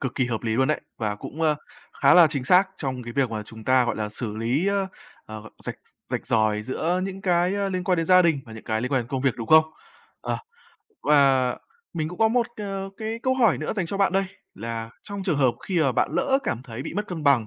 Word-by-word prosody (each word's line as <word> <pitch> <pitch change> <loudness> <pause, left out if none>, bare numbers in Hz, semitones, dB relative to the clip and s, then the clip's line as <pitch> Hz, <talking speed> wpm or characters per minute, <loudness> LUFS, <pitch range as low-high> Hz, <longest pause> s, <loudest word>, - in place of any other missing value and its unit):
cực 130 -3 -3
kỳ 130 -2 +1
hợp 115 -1 -3
lý 110 -1 -1
luôn 130 +3 +2
đấy, 155 - 0 0.2
và 105 -2 -1
cũng, 155 +9 -7
a, 155 -1 +3 0.5
khá 140 - +6
là 175 -2 +9
chính 140 -4 -3
xác 185 +5 +5
trong 130 -3 -4
cái 120 0 -7
việc 130 -3 +1
mà 110 -1 -3
chúng 110 +1 -12
ta, 130 -1 +4
gọi - - -1
là, 105 -1 -2
xử 105 0 -5
lý, 125 - 0
ơ, 200 -1 +1 0.4
ờ, 110 -1 -8 0.2
rạch - - -4 0.3
rạch - - -3
ròi 110 -1 +2
giữa 165 +9 -1
những 195 0 -5
cái, 180 +1 +2
a, 200 -1 0
liên 185 -1 -2
quan 180 -1 +2
đến 165 -1 -1
gia 185 0 +7
đình 160 -5 +2
và 110 - -11
những 110 - -10
cái 110 0 -1
liên 125 +3 -3
quan 130 - +3
đến 115 - -13
công 130 -1 -2
việc, 135 -3 +2
đúng 115 -2 -5
không? 160 0 +8 0.6
Ờ, - - -2 0.6
và 135 -4 +4 0.4
mình 155 -2 -1
cũng 180 - -9
có 220 0 +5
một 235 0 +2
c - - -8 0.4
cái 220 +1 -3
câu 260 0 +2
hỏi 230 -8 +3
nữa 155 - -2
dành 190 -6 -2
cho 195 - -4
bạn 195 -2 +2
đây, 195 0 +2 0.3
là 115 +1 -5
trong 200 -1 -6
trường 170 -7 0
hợp 130 -3 +3
khi 180 -4 +1
mà 135 -3 +2
bạn - - +1
lỡ 270 0 +2
cảm 120 - -2
thấy 125 -1 -7
bị - - -6
mất 210 +1 -2
cân 165 -4 -5
bằng, 130 -6 +4
140 Hz, 260 wpm, -25 LUFS, 115-185 Hz, 0.6 s, là